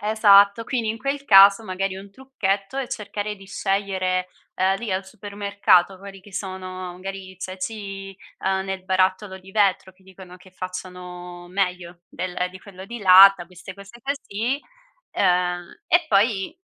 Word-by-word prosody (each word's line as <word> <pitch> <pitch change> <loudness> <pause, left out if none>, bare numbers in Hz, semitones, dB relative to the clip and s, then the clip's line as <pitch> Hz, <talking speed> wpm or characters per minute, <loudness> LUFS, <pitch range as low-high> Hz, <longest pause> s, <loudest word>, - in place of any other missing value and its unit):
Esatto. 205 0 +5
Quindi 235 -2 -2
in 225 - -5
quel 275 +2 -3
caso 200 0 +7
magari 190 0 -3
un 195 +1 -11
trucchetto 205 -3 -3
è 275 -2 -2
cercare 210 -1 -5
di 195 -1 -15
scegliere, 190 -2 -1 0.3
ehm, 190 +1 +1
lì 225 -5 -4
al 190 +1 -2
supermercato 200 -2 +1
quelli 195 0 -11
che 200 +2 -17
sono 185 -2 -6
magari 195 0 -7
i 185 - -17
ceci, 195 0 -6 0.2
uhm, 190 0 -1
nel 190 -1 -5
barattolo 190 +1 0
di 190 +1 -15
vetro 190 -2 +1
che 190 +1 -28
dicono 185 -1 -13
che 185 0 -19
facciano 180 -1 -8
meglio 180 -2 -3
del 180 0 -3
di 185 +1 -12
quello 190 -2 -12
di 235 +2 -7
latta, 190 -1 +8
queste 180 +1 -11
cose 200 +4 -14
così, 270 -1 -3 0.5
uhm, 180 - 0
e 345 -1 +4
poi 205 - +1
195 Hz, 155 wpm, -23 LUFS, 185-205 Hz, 0.5 s, latta